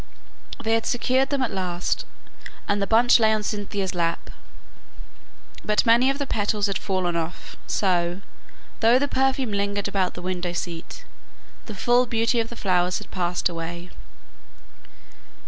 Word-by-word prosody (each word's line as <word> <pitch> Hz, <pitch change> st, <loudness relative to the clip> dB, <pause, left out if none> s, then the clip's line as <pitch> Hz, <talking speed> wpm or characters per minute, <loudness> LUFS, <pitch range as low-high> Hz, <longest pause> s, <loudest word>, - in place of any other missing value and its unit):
They 225 Hz, 0 st, +1 dB
had 225 Hz, 0 st, +1 dB
secured 260 Hz, +2 st, +1 dB
them 280 Hz, -2 st, 0 dB
at 255 Hz, -, -1 dB
last, 180 Hz, -2 st, -2 dB, 0.6 s
and 205 Hz, 0 st, +1 dB
the 200 Hz, -, 0 dB
buds 240 Hz, +2 st, +5 dB
lay 220 Hz, -1 st, +4 dB
on 215 Hz, -1 st, 0 dB
Cynthia's 205 Hz, -2 st, -3 dB
lap, 170 Hz, -1 st, -2 dB, 1.3 s
but 210 Hz, +3 st, +2 dB
many 240 Hz, +3 st, +5 dB
of 275 Hz, -, 0 dB
the 280 Hz, -, -2 dB
petals 210 Hz, -3 st, 0 dB
had 200 Hz, -2 st, -1 dB
fallen 185 Hz, -3 st, -1 dB
off; 165 Hz, 0 st, -4 dB
so, 175 Hz, -1 st, 0 dB, 0.6 s
though 230 Hz, +2 st, +5 dB
the 285 Hz, +2 st, +1 dB
perfume 265 Hz, -3 st, +1 dB
lingered 200 Hz, 0 st, -1 dB
about 195 Hz, -2 st, -1 dB
the 175 Hz, -, -7 dB
window 180 Hz, -1 st, -2 dB
seat, 170 Hz, -1 st, -6 dB, 0.6 s
the 215 Hz, -, -7 dB
full 245 Hz, +5 st, +3 dB
beauty 230 Hz, +1 st, +1 dB
of 225 Hz, 0 st, -1 dB
the 235 Hz, -, -8 dB
flowers 180 Hz, -4 st, +1 dB
had -, -, -10 dB
passed 175 Hz, -1 st, 0 dB
away. 170 Hz, +1 st, -6 dB
200 Hz, 150 wpm, -24 LUFS, 180-230 Hz, 1.3 s, buds